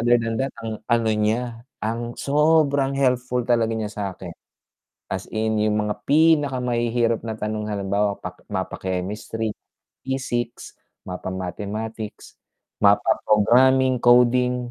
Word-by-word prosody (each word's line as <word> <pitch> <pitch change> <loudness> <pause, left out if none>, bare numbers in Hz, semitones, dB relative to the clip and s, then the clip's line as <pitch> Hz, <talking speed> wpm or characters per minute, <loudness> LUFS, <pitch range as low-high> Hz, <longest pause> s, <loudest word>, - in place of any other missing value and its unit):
other 120 +1 +4
than 115 +1 -2
that 135 0 -1
ang 110 -1 -5
ano 115 -2 +2
niya, 115 +2 -1 0.2
ang 115 +2 -3
sobrang 145 -2 +2
helpful 125 -2 +1
talaga 115 -2 +2
niya 105 -1 -3
sa'kin. 95 -4 -5 0.8
As 95 - -3
in 110 0 0
'yong 105 0 +2
mga 105 0 -1
pinakamahihirap 125 -7 +2
na 110 - -3
tanong 105 0 -3
halimbawa 100 0 0
paka - - -9
mapa-chemistry, 100 +4 -3 0.6
physics, 120 -3 -3 0.2
mapa-mathematics, 100 +4 -6 0.4
mapa-programming, 130 +4 +4
coding, 125 0 +3
115 Hz, 105 wpm, -23 LUFS, 105-125 Hz, 0.8 s, other